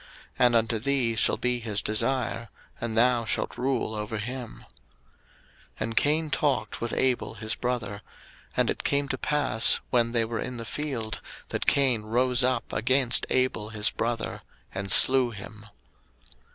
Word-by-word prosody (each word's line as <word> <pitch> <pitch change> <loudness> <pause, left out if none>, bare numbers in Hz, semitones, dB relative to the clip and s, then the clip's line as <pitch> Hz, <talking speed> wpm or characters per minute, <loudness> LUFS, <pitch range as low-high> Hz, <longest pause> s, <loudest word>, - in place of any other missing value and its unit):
And 120 -1 +5
unto 115 0 +1
thee 125 -2 0
shall - - +2
be 125 0 0
his 110 -3 -2
desire, 115 +2 -1 0.3
and 110 -1 -3
thou 120 0 +4
shalt - - -2
rule 125 -2 -1
over 105 +1 -4
him. 125 +2 -6 1.2
01:004:008 - - -14
And 115 +1 -2
Cain 155 +4 +2
talked 140 -9 0
with 120 -1 -2
Abel 130 -2 0
his 110 0 -1
brother: 120 -4 -3 0.6
and - - +3
it - - -5
came 140 0 +1
to - - -2
pass, 145 -7 +2
when 120 -1 +2
they 115 -1 +1
were 115 0 -4
in 125 - -4
the 115 - -6
field, 120 -5 -4 0.3
that - - -3
Cain 130 -5 +3
rose 125 +3 +2
up 130 0 0
against 130 -2 +2
Abel 130 -5 0
his 110 -1 +2
brother, 115 -1 -3 0.3
and 95 0 -4
slew 130 +3 +6
him. 105 -1 -10
120 Hz, 155 wpm, -27 LUFS, 110-130 Hz, 1.2 s, slew